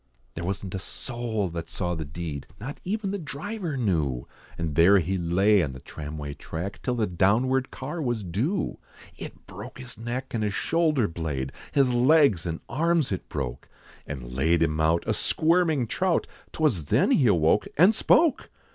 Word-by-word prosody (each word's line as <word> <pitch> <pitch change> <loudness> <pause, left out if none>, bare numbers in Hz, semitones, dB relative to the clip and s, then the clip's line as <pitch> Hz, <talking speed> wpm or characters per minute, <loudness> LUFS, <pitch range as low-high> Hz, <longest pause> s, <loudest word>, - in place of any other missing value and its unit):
There 85 - -5
wasn't 95 +1 -3
a 95 - -2
soul 115 -3 -3
that 85 0 -6
saw 90 0 -2
the 80 -2 -4
deed, 75 -1 -6
Not 135 +8 -6
even 200 +1 -2
the 200 - -3
driver 160 +2 -4
knew, 80 - 0 0.3
And 85 -3 -2
there 85 +6 +6
he 95 +1 0
lay 95 +4 +3
on 70 -5 -2
the 65 - -9
tramway 75 +1 -7
track, 85 +7 -6
Till 125 - -1
the 115 -3 +1
townward 115 +9 +2
car 150 +6 -5
was 120 -6 -1
due. 120 - -1 0.4
It - - -10
broke - - -9
his 125 -4 -10
neck, 120 +3 -4
and 110 -2 0
his 105 -1 -1
shoulder 155 -8 +2
blade, 75 -6 -3 0.2
His 135 -3 +3
legs, 125 - +4
and 80 -1 -4
arms, 160 +1 +1
its 95 - -3
broke, 65 -4 -4 0.4
And 65 -4 -6
laid 80 +6 +2
him 75 -1 0
out, 80 +2 +2
a 110 - +1
squirming 160 - +2
trout, 180 +8 +1 0.3
'Twas 125 - +1
then - - +3
he 130 - +4
awoke, 90 +1 +3
and 180 +8 +7
spoke! 315 +5 +3
105 Hz, 175 wpm, -26 LUFS, 85-140 Hz, 0.4 s, and